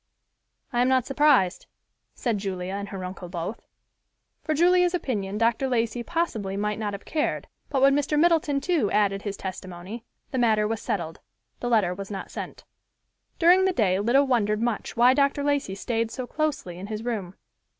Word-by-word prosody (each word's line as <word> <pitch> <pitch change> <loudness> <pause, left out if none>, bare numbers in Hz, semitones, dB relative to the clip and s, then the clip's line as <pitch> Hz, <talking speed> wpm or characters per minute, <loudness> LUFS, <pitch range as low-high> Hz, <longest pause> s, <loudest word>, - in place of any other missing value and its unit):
"I 240 - +2
am 250 - +3
not 260 -2 +3
surprised," 270 -9 +3 0.5
said 230 -5 -1
Julia 190 -2 -4
and 200 0 -4
her 190 -2 -5
uncle 180 -1 -7
both. 175 +5 -5 0.8
For 310 - 0
Julia's 360 +2 +4
opinion 210 - -2
Dr. 230 +4 +2
Lacey 240 -1 0
possibly 230 - -2
might 210 +1 -1
not 210 -2 -2
have 200 - -8
cared, 305 -1 -1 0.2
but 270 -2 +1
when 275 0 +6
Mr. 290 +1 +1
Middleton 315 -4 +3
too 320 - +1
added 200 -1 +1
his 205 -1 -5
testimony, 185 +3 -7 0.3
the 260 - -1
matter 215 -3 +3
was 225 -1 -3
settled. 165 -4 -3 0.4
The 245 - -2
letter 210 -7 +3
was 195 +1 -7
not 195 -2 -6
sent. - - -7 0.7
During 360 +3 +5
the 380 - +2
day 190 - +2
Lida 245 +7 +3
wondered 215 -5 +1
much 235 0 -2
why 245 +2 +6
Dr. 280 +1 +2
Lacey 285 -9 0
stayed 225 +2 -1
so 255 +2 -5
closely 270 - -3
in 195 - -7
his 215 +1 -5
room. 205 -6 -3
225 Hz, 175 wpm, -26 LUFS, 195-275 Hz, 0.8 s, when